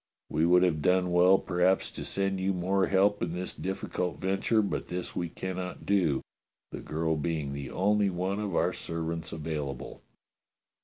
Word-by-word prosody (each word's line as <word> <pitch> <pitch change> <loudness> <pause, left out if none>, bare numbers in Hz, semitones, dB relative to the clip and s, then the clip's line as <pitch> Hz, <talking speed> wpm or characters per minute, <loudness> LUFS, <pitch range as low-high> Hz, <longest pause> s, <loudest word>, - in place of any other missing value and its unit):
We 80 +2 +2
would 90 +1 +6
have 80 -4 +2
done 90 +2 +2
well 90 +2 +6
perhaps 90 +1 +1
to - - -6
send 95 -1 -1
you 95 +1 +1
more 95 +2 +1
help 100 +2 +3
in 85 -1 -1
this 90 +1 -3
diflBcult 90 -4 -3
venture, 95 +5 +1
but 100 - -3
this 90 0 -5
we 85 -1 -2
cannot 90 +1 -5
do, 90 -9 +2 0.5
the - - -6
girl 80 +1 -1
being 75 -2 -2
the 70 -1 -5
only 105 +1 +2
one 95 +3 -2
of 100 -5 -2
our 90 +2 +2
servants 80 -1 -4
available. 75 -5 -5
90 Hz, 165 wpm, -29 LUFS, 80-95 Hz, 0.5 s, would